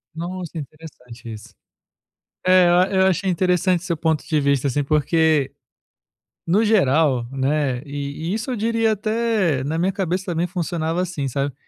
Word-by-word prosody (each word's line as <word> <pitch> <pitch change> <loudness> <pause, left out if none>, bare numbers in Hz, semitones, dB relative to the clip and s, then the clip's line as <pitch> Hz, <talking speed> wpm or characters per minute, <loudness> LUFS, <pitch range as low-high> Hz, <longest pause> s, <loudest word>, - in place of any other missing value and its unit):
Nossa, 175 0 -6
interessante 125 -6 -10
isso. 110 0 -11 0.9
É, 185 -1 +6 0.3
e - - 0
eu 190 0 +4
achei 190 +1 +1
interessante 180 0 +1
seu 170 -3 -2
ponto 160 -1 -1
de 155 -2 +1
vista, 140 -1 +1
assim, 145 +2 -1
porque, 155 -1 +2 0.9
no 195 +7 +3
geral, 150 - +2
né, 135 -1 0
e 145 +3 -5
e - - 0
isso 225 +4 -4
eu 250 - -2
diria 225 0 +1
até 215 - 0
na 155 +4 -2
minha 185 +3 +1
cabeça 185 -1 -2
também 175 -1 -1
funcionava 170 -2 -2
assim, 165 -7 -3
sabe. 140 +1 -2
165 Hz, 155 wpm, -21 LUFS, 140-185 Hz, 0.9 s, É